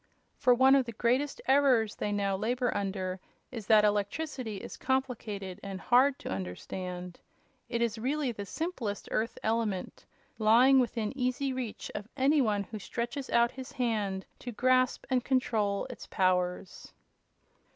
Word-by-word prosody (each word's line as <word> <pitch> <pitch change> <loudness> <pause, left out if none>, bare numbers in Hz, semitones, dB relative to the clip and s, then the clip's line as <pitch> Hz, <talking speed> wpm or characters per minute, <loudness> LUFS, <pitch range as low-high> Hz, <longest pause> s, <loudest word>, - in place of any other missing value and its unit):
For 250 -1 +4
one 260 +2 +6
of 270 -3 +4
the 235 - -5
greatest 255 +6 0
errors 260 -6 +4
they 205 - -2
now 200 -1 0
labor 240 +5 -1
under 190 -2 -2 0.3
is 225 -5 -7
that 215 -1 +6
electricity 215 +3 -1
is - - -8
complicated 220 -8 -2
and 195 -1 -6
hard 260 +6 +4
to - - -7
understand. 180 - -5 0.5
It 235 -1 0
is 230 -1 -1
really 270 +2 0
the 205 -3 -7
simplest 245 - -4
Earth 225 +2 -1
element, 220 -4 -2 0.3
lying 240 +5 +6
within 230 -2 -1
easy 260 +1 -1
reach 250 -4 -5
of 205 - -6
any 285 +2 +4
one 210 -4 +1
who 215 +2 -8
stretches 240 +7 -4
out 235 +1 +3
his 260 -1 -9
hand 210 -7 -1
to 245 - -6
grasp 255 +2 +2
and 250 -2 +2
control 220 -7 0
its - - -9
powers." 180 0 -1
230 Hz, 150 wpm, -30 LUFS, 200-255 Hz, 0.5 s, one